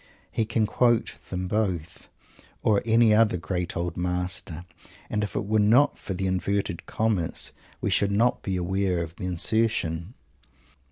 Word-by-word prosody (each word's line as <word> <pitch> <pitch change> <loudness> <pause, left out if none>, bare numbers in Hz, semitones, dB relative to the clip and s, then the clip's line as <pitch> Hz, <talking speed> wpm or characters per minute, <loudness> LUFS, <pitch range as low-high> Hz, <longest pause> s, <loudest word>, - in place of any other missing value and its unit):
He 110 - 0
can 110 0 +1
quote 120 +1 +1
them 90 0 -3
both 90 -6 -2 0.5
or 105 -2 +3
any 115 -1 +5
other 105 -3 +4
great 90 0 -3
old 85 0 -2
master 90 -2 -2 0.5
and 105 0 0
if 105 - -5
it - - -1
were 110 +1 +2
not 120 +8 +4
for 95 - -6
the 95 +1 -2
"inverted 95 -1 -1
commas" 105 -7 +1 0.3
we - - 0
should 100 0 +2
not 115 +5 +2
be 95 - -2
aware 90 -1 0
of 80 0 -9
the 90 - -4
insertion. 90 0 0
95 Hz, 155 wpm, -26 LUFS, 90-110 Hz, 0.5 s, any